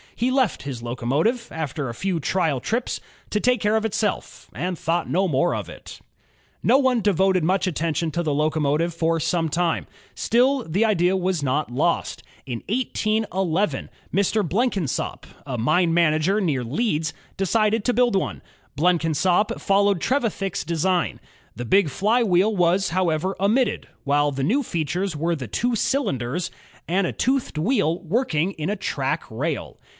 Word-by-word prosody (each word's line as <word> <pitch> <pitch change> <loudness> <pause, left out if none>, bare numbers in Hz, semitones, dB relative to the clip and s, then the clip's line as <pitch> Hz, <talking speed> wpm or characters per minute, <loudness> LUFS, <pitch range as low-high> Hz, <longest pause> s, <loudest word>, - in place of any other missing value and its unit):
He 245 +3 0
left 255 - +1
his 130 -5 -6
locomotive, 135 - 0
after 150 -3 -3
a 115 - -6
few 185 +1 -1
trial 160 -2 0
trips, 235 - -2 0.3
to 210 - +1
take 250 +2 +2
care 210 +1 +2
of 220 0 +1
itself, 215 0 -2
and 180 0 -3
thought 165 +2 -1
no 190 +3 +2
more 165 +3 +1
about - - -4
it. - - -11 0.6
No - - +5
one 260 -4 +2
devoted 190 -3 +2
much 185 +3 +2
attention 165 -1 -1
to 170 +3 -1
the 155 -3 0
locomotive 155 +2 +1
for 165 0 +1
some 165 +1 0
time. 170 +1 0 0.3
Still, 255 +3 +2
the 195 +6 +1
idea 190 -3 +2
was 185 -3 0
not 140 0 -1
lost. 125 - 0 0.3
In 120 -3 -5
181 215 -4 -1
1, 195 +6 0 0.2
Mr. 200 0 +1
Bleokinsop, 195 - -1 0.2
a 130 -3 -4
mine 165 +8 +2
manager 165 +4 +3
near 145 -9 0
Leeds, 160 - -1 0.2
decided 215 +3 +1
to* 245 - +2
build 245 -3 +3
one. 190 - -1 0.3
Blenkinsop 175 +3 +2
followed 200 -2 +2
Trevithick's 220 -8 -1
design. 170 +1 0 0.4
The 120 - -5
big 190 - +3
flywheel 210 - +2
was, 180 +2 +2
however, 180 +1 0
omitted, 215 +4 +1 0.2
while 145 0 +2
the 135 -1 -3
new 240 - +2
features 175 - -2
were 165 +3 0
the 130 -6 -6
two 240 - 0
cylinders 170 - -1 0.4
and 185 +3 +1
a - - -3
toothed 260 - 0
wheel 170 - +1
working 180 - 0
in 155 0 -4
a 210 - -1 0.2
rack - - -1
rail. - - -4
180 Hz, 155 wpm, -23 LUFS, 155-210 Hz, 0.6 s, No